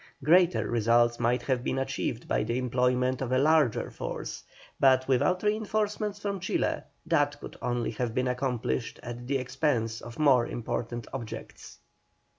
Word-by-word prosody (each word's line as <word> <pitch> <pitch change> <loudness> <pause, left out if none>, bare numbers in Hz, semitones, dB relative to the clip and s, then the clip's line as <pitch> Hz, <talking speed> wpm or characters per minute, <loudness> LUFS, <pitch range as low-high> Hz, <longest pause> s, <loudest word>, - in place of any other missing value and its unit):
Greater 175 +3 +4
results 120 +1 +3
might 120 +1 +1
have 125 -1 0
been 130 - -1
achieved 130 -3 -2
by - - +1
the 115 +3 -1
employment 125 0 +1
of 130 -2 -2
a 130 - +3
larger 150 -3 +3
force, - - -5 0.4
but 130 -1 +4
without 135 - +2
reinforcements 210 -1 -1
from 200 -1 -3
Chile, 185 - -1 0.2
that - - +1
could - - -9
only 120 -1 -1
have 115 0 -3
been 130 0 +1
accomplished 125 - -2
at 120 +1 -7
the 140 +1 +1
expense 125 -3 -1
of 120 0 -10
more 135 -6 +4
important 120 0 -4
objects. 120 -5 -8
125 Hz, 150 wpm, -28 LUFS, 120-145 Hz, 0.4 s, Greater